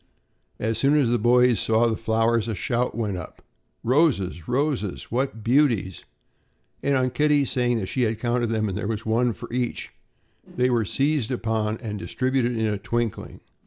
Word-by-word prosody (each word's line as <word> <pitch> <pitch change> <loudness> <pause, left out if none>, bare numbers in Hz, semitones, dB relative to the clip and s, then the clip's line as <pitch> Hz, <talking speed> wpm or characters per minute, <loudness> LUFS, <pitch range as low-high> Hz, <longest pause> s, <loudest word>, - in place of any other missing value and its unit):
As 110 0 -1
soon 140 +5 +3
as 140 -6 +3
the 120 - +2
boys 125 +1 +4
saw 115 +1 +2
the 115 -1 +1
flowers, 115 +1 +1
a 110 - -2
shout 120 +6 -1
went 105 -5 -2
up: 90 - -10 0.4
"Roses! 120 - +1
roses! 130 -6 -2
What 120 -2 -2
beauties!" 115 - +1 0.8
and 140 0 +1
on 130 -1 +1
Kitty 150 0 +2
saying 120 -2 +1
that 105 - -2
she 130 - -2
had 110 -2 +1
counted 120 +1 0
them 110 -1 0
and 95 - -3
there 105 0 -3
was 110 -1 -3
one 120 +2 +2
for 110 +3 -9
each, 125 -1 -2 0.5
they 125 +1 -1
were 115 -3 +1
seized 140 +2 0
upon 110 -3 -1
and 105 -3 -5
distributed 130 0 -1
in 110 - 0
a 105 -2 -1
twinkling. 120 0 -3
120 Hz, 175 wpm, -24 LUFS, 110-125 Hz, 0.8 s, boys